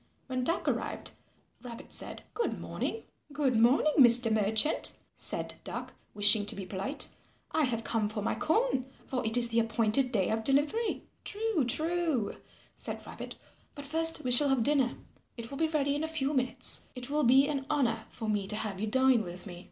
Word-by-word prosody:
When 255 -1 -3
Duck 335 +7 -2
arrived, - - -3 0.5
Rabbit 235 -2 -9
said, - - -3
"Good 470 - -3
morning." 450 - -5 0.3
"Good 280 -3 -1
morning, 250 +7 +3
Mr. 240 -2 +8
Merchant," 220 +6 +2 0.2
said - - -1
Duck, - - -7 0.2
wishing 210 0 +6
to - - +1
be 195 - -7
polite. 195 +9 -2 0.4
"I 315 -2 +1
have 230 -3 -3
come 220 -3 -1
for 215 -1 -5
my - - -1
corn, 320 - -1 0.2
for 255 -2 -4
it 225 +1 +1
is 235 -1 +6
the 230 0 +1
appointed 230 +3 0
day 195 -7 0
of 220 0 -2
delivery." 290 - 0 0.2
"True, 415 - -1
true," 315 -4 -1 0.4
said - - -5
Rabbit, - - -9 0.4
"but 285 -1 -9
first 325 +3 +4
we 250 - -2
shall 280 +4 +6
have 265 -4 +1
dinner. 270 -2 +1 0.4
It 230 +1 -7
will 275 - -7
be 320 - +1
ready 285 -3 -1
in 295 +2 -3
a - - -2
few 275 0 -1
minutes. 255 -2 +4
It 250 +2 -3
will 300 0 0
be 265 +3 +4
an 280 -2 -4
honour 240 -7 -1
for 225 - -7
me 205 -2 -2
to 210 - +2
have 205 -3 -4
you 220 - -2
dine 260 +1 +3
with 180 -1 -9
me." 175 -3 -10
255 Hz, 190 wpm, -29 LUFS, 220-290 Hz, 0.5 s, Mr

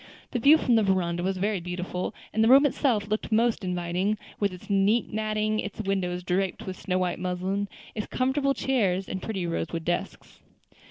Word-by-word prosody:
The 245 - -1
view 285 +7 +7
from 255 -5 +1
the - - +4
veranda 180 -4 +1
was 190 +1 -1
very 200 +1 0
beautiful, 180 +1 -4 0.2
and 220 - +3
the - - +4
room 270 +4 +7
itself 245 -6 +1
looked 215 +2 -2
most 225 0 +2
inviting, 180 +3 -1 0.2
with 200 -2 +1
its 180 +3 -11
neat 205 +3 +2
matting, 215 0 0
its 205 +1 -5
windows 185 -3 -1
draped 185 +1 -1
with 185 - -5
snow 185 -1 -1
white 180 -1 -1
muslin, 185 +3 -2 0.3
its 215 - -4
comfortable 275 +2 +1
chairs, 195 -9 0
and 190 - -4
pretty 195 -4 -3
rosewood 165 -1 -3
desks. 175 0 -3
195 Hz, 180 wpm, -27 LUFS, 180-220 Hz, 0.3 s, view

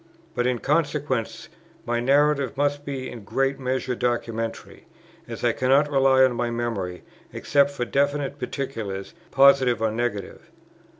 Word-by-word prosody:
But 120 - 0
in 125 -1 +1
consequence, 145 -4 -1 0.4
my 120 0 0
narrative 140 +1 +2
must 145 0 0
be 135 -2 -4
in 115 - -9
great 135 +6 -1
measure 130 -1 -2
documentary, 115 -2 -3 0.4
as - - -7
I - - +3
cannot 140 +3 +2
rely 135 -1 +4
on 130 -1 +3
my 120 0 -1
memory, 115 -7 -3 0.3
except 140 -1 +2
for 140 -4 -4
definite 140 +2 -1
particulars, 110 -8 -5 0.2
positive 135 -3 +5
or 110 -1 0
negative. 110 -3 -4
130 Hz, 135 wpm, -24 LUFS, 120-140 Hz, 0.4 s, positive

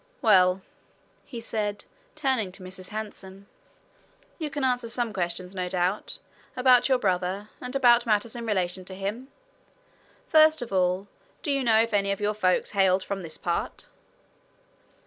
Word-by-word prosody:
"Well," 190 -3 +5 0.6
he 240 - -7
said, 210 -2 -3 0.3
turning 260 -10 0
to 195 - -10
Mrs. 185 0 -9
Hanson, 200 -2 -7 0.9
"you 310 -2 -3
can 290 -2 -4
answer 245 -2 0
some 235 -2 -2
questions, 180 0 -2
no 180 -1 -3
doubt, 180 +3 -1 0.4
about 250 0 +5
your 260 - +4
brother, 190 0 -1
and 250 +1 -5
about 240 -3 +5
matters 215 +1 +1
in 235 -1 -5
relation 185 -3 0
to 190 - -9
him. 205 +7 -4 1.0
First 315 -3 +5
of 230 - -8
all, 185 +1 +1 0.4
do 295 - -1
you 275 -1 +1
know 225 -2 +4
if 230 - -5
any 200 -1 +2
of 200 - -2
your 210 0 0
folks 185 -4 +1
hailed 190 -2 +3
from 200 -1 -4
this 165 -3 -5
part?" 170 -1 -3
205 Hz, 155 wpm, -26 LUFS, 185-240 Hz, 1.0 s, Well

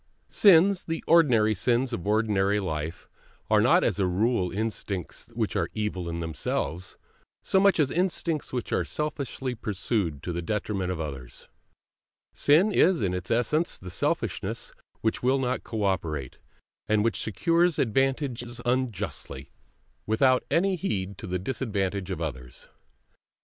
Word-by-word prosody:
Sins, 190 0 +5
the 165 0 -3
ordinary 125 -10 +5
sins 120 +5 +1
of 100 -3 -4
ordinary 105 -2 +2
life, 80 -2 -4 0.4
are - - +5
not - - +4
as - - 0
a 95 - +2
rule 95 +1 +1
instincts 100 -3 -3
which - - -1
are - - 0
evil 100 -5 -2
in 85 0 -4
themselves, 80 +2 -3 0.5
so 190 - +3
much 200 -2 +4
as 145 -3 +2
instincts 170 -3 -1
which 125 -2 -3
are - - +2
selfishly 140 -4 -3
pursued 105 - -2
to 90 - -3
the 85 - -2
detriment 95 -1 -2
of 90 - -4
others; 70 -6 -7 0.8
sin 165 +9 +4
is 180 - +3
in 90 -2 0
its 90 0 -4
essence 135 +8 +1
the 90 -1 -9
selfishness 90 - -2 0.3
which 110 - 0
will 130 +2 +3
not 130 -1 -1
cooperate, 90 - -2 0.5
and 105 -1 +2
which 115 - 0
secures 165 - +2
advantages 130 0 0
unjustly, 105 - -3 0.6
without 130 +4 +3
any 190 +3 +2
heed 100 - -3
to - - -7
the 90 0 -1
disadvantage 100 -3 -2
of 95 - -3
others. 65 -6 -6
110 Hz, 140 wpm, -27 LUFS, 90-135 Hz, 0.8 s, Sins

